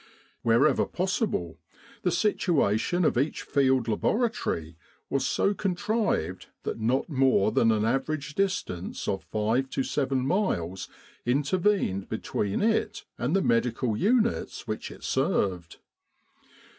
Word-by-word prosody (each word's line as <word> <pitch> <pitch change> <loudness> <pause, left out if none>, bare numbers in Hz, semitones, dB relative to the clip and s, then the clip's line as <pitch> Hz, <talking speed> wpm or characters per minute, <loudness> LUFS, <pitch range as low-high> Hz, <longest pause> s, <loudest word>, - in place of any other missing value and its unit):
Wherever 120 +4 +3
possible, 185 - -2 0.4
the - - +1
situation 175 - +1
of 125 - +2
each 145 +4 -1
Field 130 -4 +2
Laboratory 110 - -1 0.4
was 135 -1 +1
so 200 - +1
contrived 195 - -1 0.2
that - - -3
not 120 +5 +1
more 130 -8 +3
than 115 - +3
an 110 -1 +1
average 145 +4 -1
distance 185 - -2
of 95 - -1
five 115 +5 0
to 135 - -1
seven 135 -2 0
miles 95 - -1 0.3
inter 140 +8 +1
vened 175 - +1
between 100 - -2
it 225 0 0
and 135 +9 0
the 195 - +2
medical 115 0 +1
units 230 - +1
which 110 - -4
it - - -12
served. 100 - 0
135 Hz, 120 wpm, -27 LUFS, -, 0.4 s, Wherever